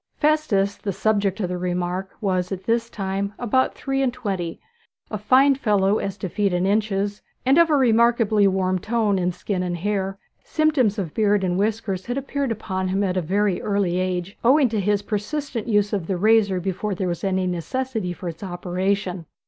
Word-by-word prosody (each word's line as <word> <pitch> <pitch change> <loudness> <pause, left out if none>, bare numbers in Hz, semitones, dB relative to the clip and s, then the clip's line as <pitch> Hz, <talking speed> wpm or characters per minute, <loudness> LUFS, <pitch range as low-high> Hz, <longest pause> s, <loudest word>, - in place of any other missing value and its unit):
Festus, 270 -11 +1
the 200 - -3
subject 200 0 0
of 180 - -1
the 180 0 -3
remark, 180 +1 -2
was 185 -3 0
at 190 -1 -4
this 230 0 0
time 200 0 -3
about 255 +2 +1
three 270 -1 -2
and 260 -2 +2
twenty, 195 -9 -4 0.5
a 215 - -2
fine 260 +6 +5
fellow 210 -5 +2
as 195 0 -4
to 190 - -4
feet 200 +2 0
and 180 +1 +1
inches, 205 0 0 0.2
and 270 +5 +5
of 335 -1 +5
a 305 - +4
remarkably 230 -4 +4
warm 185 -1 +1
tone 215 -1 +1
in 180 0 +1
skin 180 +1 -3
and 175 -1 -2
hair. 195 +1 -2 0.3
Symptoms 290 -9 +2
of 180 -7 -3
beard 205 -2 +2
and 180 0 0
whiskers 205 -2 -1
had 245 +2 -2
appeared 275 -1 -2
upon 190 -4 -3
him 195 +2 0
at 185 -2 0
a 185 - +1
very 195 +3 0
early 200 -3 0
age, 185 +1 -2
owing 265 +2 +5
to 220 -1 -1
his 205 +1 +1
persistent 230 +3 -3
use 205 -2 +2
of 190 -5 -1
the 190 - -1
razor 205 -1 +3
before 190 +2 -2
there 185 +1 -2
was 175 -2 -3
any 190 -1 0
necessity 210 +3 -2
for 175 +1 -7
its 165 -1 -6
operation. 185 -1 -2
200 Hz, 190 wpm, -23 LUFS, 185-225 Hz, 0.5 s, fine